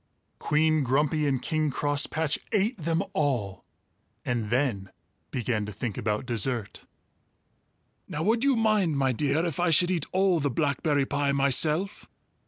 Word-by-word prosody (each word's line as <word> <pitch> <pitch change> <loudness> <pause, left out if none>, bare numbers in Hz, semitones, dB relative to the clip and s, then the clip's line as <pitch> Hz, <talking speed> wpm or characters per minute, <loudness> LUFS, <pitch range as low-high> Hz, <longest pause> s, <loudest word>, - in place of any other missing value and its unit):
Queen 155 0 +2
Grumpy 150 +4 +1
and 130 -3 -1
King 155 0 0
Crosspatch 145 +2 0
ate 215 +3 +1
them 165 +3 0
all 120 -11 -1 0.6
and 120 -4 -2
then 120 -7 0 0.4
began 115 -3 -2
to - - -5
think 105 0 -4
about 105 +2 -2
dessert! 120 -2 -3 1.2
"Now 150 - -4
would 225 +5 +2
you 275 -1 +3
mind, 215 -9 +2
my 135 -1 +2
dear, 145 +6 0
if 170 -3 -3
I 175 -1 +2
should 175 +3 +4
eat 170 -5 -1
all 190 -2 +2
the 145 -1 0
blackberry 145 0 0
pie 140 0 0
myself?" 150 +8 0
145 Hz, 145 wpm, -27 LUFS, 130-165 Hz, 1.2 s, should